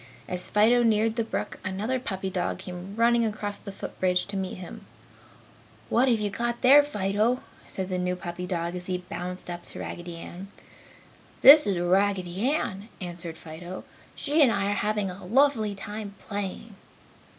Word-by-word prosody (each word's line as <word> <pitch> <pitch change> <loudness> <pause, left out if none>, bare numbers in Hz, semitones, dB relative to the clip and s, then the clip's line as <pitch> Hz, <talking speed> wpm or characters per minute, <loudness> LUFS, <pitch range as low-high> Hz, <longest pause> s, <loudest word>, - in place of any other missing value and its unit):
As 180 0 -2
Fido 225 +4 +5
neared 220 -1 +2
the 230 - +1
brook, 225 - -4
another 210 +7 -1
puppy 190 -6 -4
dog 180 -1 -1
came 185 +1 -8
running 235 +1 +4
across 210 -2 -2
the 200 - -8
foot 195 - -8
bridge 180 -1 +2
to 200 - -6
meet 190 -1 -3
him. 180 -1 -9 1.1
"What 250 +3 +3
have 230 -3 +3
you 205 -1 -1 0.3
there, 275 +3 +8
Fido?" 220 -2 0 0.2
said 190 -1 -4
the 185 -1 -1
new 180 0 0
puppy 180 0 -6
dog 170 -1 -2
as 180 0 -6
he 185 -1 0
bounced 180 0 -6
up 175 0 -6
to - - -6
Raggedy 175 0 -6
Ann. 180 +3 -8 1.0
"This 295 0 +10
is 195 -3 +1
Raggedy 190 +3 +1
Ann," 210 -8 -2
answered 175 -2 -6
Fido. 175 +3 -8 0.3
"She 300 +2 +1
and 265 -5 +6
I 200 -1 0
are - - +2
having 205 -1 0
a 185 +2 -10
lovely 225 -1 +2
time 205 0 -7
playing." 205 +2 -5
195 Hz, 170 wpm, -27 LUFS, 180-220 Hz, 1.1 s, This